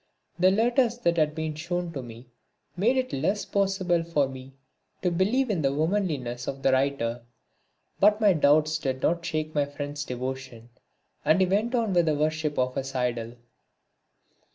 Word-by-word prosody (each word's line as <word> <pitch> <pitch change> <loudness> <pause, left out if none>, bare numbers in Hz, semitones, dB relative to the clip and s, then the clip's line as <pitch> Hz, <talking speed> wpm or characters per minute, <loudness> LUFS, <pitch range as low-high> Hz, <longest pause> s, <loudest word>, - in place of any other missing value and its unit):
The 185 +1 +6
letters 235 +4 +2
that 165 -7 +1
were 160 -1 -3
shown 175 +2 -3
to 135 - -4
me 120 0 -11 0.5
made 225 +9 +2
it 255 0 0
still - - -3
less 195 +8 0
possible 190 -4 +1
for 150 -4 +1
me 130 0 -10 0.5
to 180 - +2
believe 215 +9 +1
in 180 -6 0
the 135 -2 +2
womanliness 150 -7 -1
of 135 0 -5
the 135 - +4
writer. 130 -3 0 0.8
But 210 +1 +5
my 210 -3 +5
doubts 155 0 +3
did 130 -2 -3
not 170 0 +1
shake 155 -2 -3
my 145 -1 +2
friend's 145 0 -5
devotion 125 -2 -6 0.5
and 160 - +3
he 190 - +5
went 210 +7 0
on 225 -5 0
with 175 -2 +3
the 155 - +2
worship 155 0 -1
of 125 0 +1
his 135 0 -4
idol. 120 -2 -2
155 Hz, 170 wpm, -26 LUFS, 135-190 Hz, 0.8 s, The